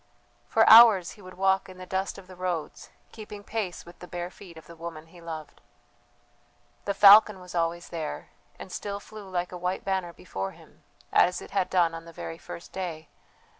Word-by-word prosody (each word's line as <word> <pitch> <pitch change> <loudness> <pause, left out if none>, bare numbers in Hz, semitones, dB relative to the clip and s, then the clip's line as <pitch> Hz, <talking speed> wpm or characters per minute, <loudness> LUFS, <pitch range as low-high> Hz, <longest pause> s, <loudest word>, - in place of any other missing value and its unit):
For 225 - +3
hours 220 -6 +8
he 210 - -15
would 185 -1 -12
walk 190 0 +1
in 185 - -12
the 185 - -9
dust 190 +1 -3
of 195 - -12
the 185 0 -13
roads, 180 -3 -4 0.2
keeping 210 -2 -10
pace 205 -5 -4
with 175 +1 -15
the 180 - -10
bare 175 0 -5
feet 175 -4 -14
of 160 - -13
the 170 - -13
woman 165 -1 -8
he 170 +1 -17
loved. 160 -2 -8 1.2
The 200 - -1
falcon 205 0 +8
was 180 -1 -12
always 170 0 -1
there, 160 - -5 0.3
and - - -10
still 200 -1 -5
flew 205 -1 -11
like 180 -1 -2
a 180 - -6
white 180 +1 -2
banner 190 -3 -1
before 95 - -6
him, - - -19 0.3
as 180 - +4
it - - -11
had 195 -2 0
done 175 -3 +2
on 165 0 -8
the 165 - -12
very 165 +1 -7
first 170 - -10
day. 165 -4 -6
180 Hz, 200 wpm, -27 LUFS, 170-195 Hz, 1.2 s, hours